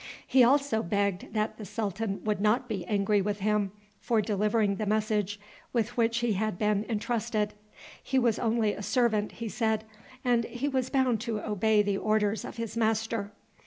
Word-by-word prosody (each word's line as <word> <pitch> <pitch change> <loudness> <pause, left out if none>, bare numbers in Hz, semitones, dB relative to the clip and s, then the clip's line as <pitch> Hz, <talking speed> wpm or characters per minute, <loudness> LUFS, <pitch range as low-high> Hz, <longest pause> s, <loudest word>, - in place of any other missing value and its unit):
He 260 -1 +5
also 275 -2 +3
begged 200 0 -1
that 215 +1 -1
the - - -6
sultan 205 0 -3
would 210 -2 -1
not 230 +4 +2
be 195 -7 -3
angry 205 0 +2
with 205 +1 -1
him 210 -1 +1 0.3
for 230 -2 +1
delivering 210 -1 +1
the 215 - -2
message 210 -1 0 0.3
with 235 0 0
which 230 -1 +2
he 240 -2 +1
had 215 -1 -1
been 210 0 +1
intrusted. 220 -1 -1 0.5
He 265 - -1
was 240 -4 +2
only 225 -2 +1
a - - -7
servant, 220 -2 +1
he 230 - -5
said, 220 -1 0 0.4
and 240 -2 +3
he 245 +5 -3
was 260 -2 0
bound 255 -5 +2
to 230 -3 -2
obey 210 0 +2
the 200 -1 0
orders 215 0 +1
of - - -8
his 230 -1 -4
master. 220 -2 0
215 Hz, 175 wpm, -29 LUFS, 205-230 Hz, 0.5 s, He